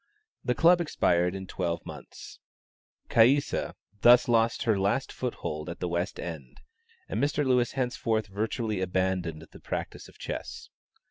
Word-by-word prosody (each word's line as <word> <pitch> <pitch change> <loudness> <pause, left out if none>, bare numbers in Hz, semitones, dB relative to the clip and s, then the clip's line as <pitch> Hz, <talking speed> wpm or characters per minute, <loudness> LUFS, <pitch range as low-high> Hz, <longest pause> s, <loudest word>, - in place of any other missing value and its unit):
The 125 - 0
club 170 +4 +5
expired 90 - +1
in 95 0 -6
twelve 85 -2 -3
months. - - -11 0.7
Caïssa 130 +5 +3 0.3
thus 120 +1 +7
lost 115 -1 +2
her 110 -4 +2
last 105 +7 0
foothold 75 -11 -4
at 85 - -7
the 90 - -2
West 85 +2 -2
End, 75 -7 -7 0.5
and 110 - -2
Mr. 145 0 +1
Lewis 125 -2 +2
henceforth 120 -4 -1
virtually 110 0 -2
abandoned 90 -3 -1
the - - -13
practice - - -5
of - - -18
chess. - - -6
110 Hz, 140 wpm, -28 LUFS, 90-125 Hz, 0.7 s, thus